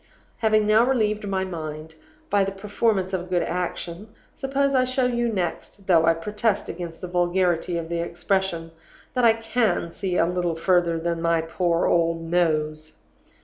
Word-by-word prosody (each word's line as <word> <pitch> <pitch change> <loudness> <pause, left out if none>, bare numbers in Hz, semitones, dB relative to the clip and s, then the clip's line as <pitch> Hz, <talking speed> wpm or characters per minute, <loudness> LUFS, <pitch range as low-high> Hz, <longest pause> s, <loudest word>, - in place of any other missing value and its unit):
"Having 215 -2 +3
now 215 +2 +5
relieved 215 -5 +1
my 190 -1 -1
mind 155 -3 -6 0.4
by 200 -1 +4
the 195 - -2
performance 195 -1 -1
of 185 - 0
a - - -8
good 180 -1 0
action, 175 +2 -4 0.3
suppose 275 +1 0
I 255 -1 +4
show 255 0 0
you 240 -1 0
next 195 0 -4
(though 165 -3 +4
I 165 - +5
protest 210 +5 -1
against 170 -1 -7
the 180 - -4
vulgarity 175 -1 +1
of 165 -1 -4
the 170 0 -2
expression) 170 0 -1 0.4
that 250 -2 +2
I 225 - +7
can 225 -6 0
see 180 0 -2
a - - +4
little 175 -1 -1
further 170 0 +2
than 170 0 -2
my 165 -1 +2
poor 170 +1 0
old 165 -1 +1
nose? 155 -2 0
180 Hz, 170 wpm, -24 LUFS, 170-210 Hz, 0.4 s, I